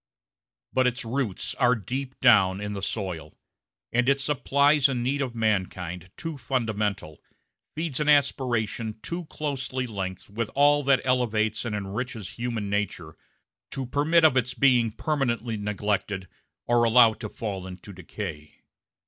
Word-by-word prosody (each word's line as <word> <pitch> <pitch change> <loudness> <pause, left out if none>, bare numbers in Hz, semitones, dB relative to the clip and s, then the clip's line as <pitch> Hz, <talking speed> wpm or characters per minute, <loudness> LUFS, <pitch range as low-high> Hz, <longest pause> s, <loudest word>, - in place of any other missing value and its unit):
But 130 -1 +3
its 125 +1 -2
roots 115 -4 -2
are 125 -1 +4
deep 130 +5 -5
down 100 -6 +5
in 105 0 -4
the 100 - -5
soil; 90 -7 -4 0.6
and 125 +2 +3
it 140 0 +3
supplies 140 0 +3
a 135 - -1
need 130 +4 -1
of 125 -3 -3
mankind 95 -5 -1
too 165 -4 -5
fundamental, 105 - -2 0.5
feeds 155 -3 -2
an 150 0 +1
aspiration 120 -6 +1
too 170 0 -4
closely 135 -4 -3
linked 95 -5 -5
with 110 +1 -2
all 145 +1 +5
that 135 -1 +4
elevates 110 -4 +1
and 110 -3 -2
enriches 105 +1 -4
human 115 -3 -3
nature, 100 -6 -2 0.5
to 135 -1 -3
permit 155 +6 +3
of 150 - +5
its 125 -1 +1
being 125 -4 +4
permanently 120 -2 -1
neglected 105 -2 -2 0.4
or 120 0 +3
allowed 115 -1 +6
to 110 - -5
fall 100 -5 -5
into 95 +2 -10
decay. 80 -4 -7
115 Hz, 140 wpm, -26 LUFS, 105-135 Hz, 0.6 s, allowed